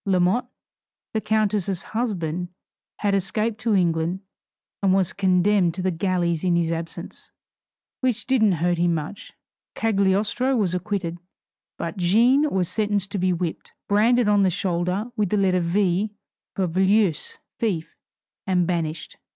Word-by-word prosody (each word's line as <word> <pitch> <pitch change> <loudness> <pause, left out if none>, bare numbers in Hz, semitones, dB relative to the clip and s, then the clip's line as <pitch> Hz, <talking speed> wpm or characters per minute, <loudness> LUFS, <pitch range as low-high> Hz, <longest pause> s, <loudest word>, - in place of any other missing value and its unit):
Lamotte, 190 +6 +2 0.7
the 220 - 0
countess' 210 -3 0
husband, 180 -7 -2 0.5
had 205 -1 +1
escaped 215 +3 -1
to 220 -2 +1
England, 170 0 +1 0.6
and 190 -1 +3
was 190 -3 +1
condemned 185 -1 +2
to 185 - -4
the 185 - +1
galleys 170 -1 0
in 180 -2 +2
his 170 -1 +1
absence, 165 0 -6 0.7
which 245 -4 -1
didn't 225 -6 +3
hurt 175 +1 0
him 170 -1 +2
much. 155 +6 -6 0.4
Cagliostro 215 +5 +1
was 195 -5 +1
acquitted. 180 -2 -3 0.6
But 170 +4 -5
Jeanne 235 +11 +4
was 185 -6 0
sentenced 205 0 0
to 200 - -2
be 185 0 +2
whipped, 175 -2 -4
branded 225 +3 +3
on 205 -1 +4
the 190 - +4
shoulder 185 +4 -1
with 210 -4 0
the 210 - +1
letter 185 -2 +2
V 185 +3 +1 0.5
for 195 - +1
Voleuse 190 0 +1 0.2
(thief), 185 -8 -2 0.5
and 180 -2 +2
banished. 165 -3 -3
190 Hz, 140 wpm, -23 LUFS, 175-210 Hz, 0.7 s, Jeanne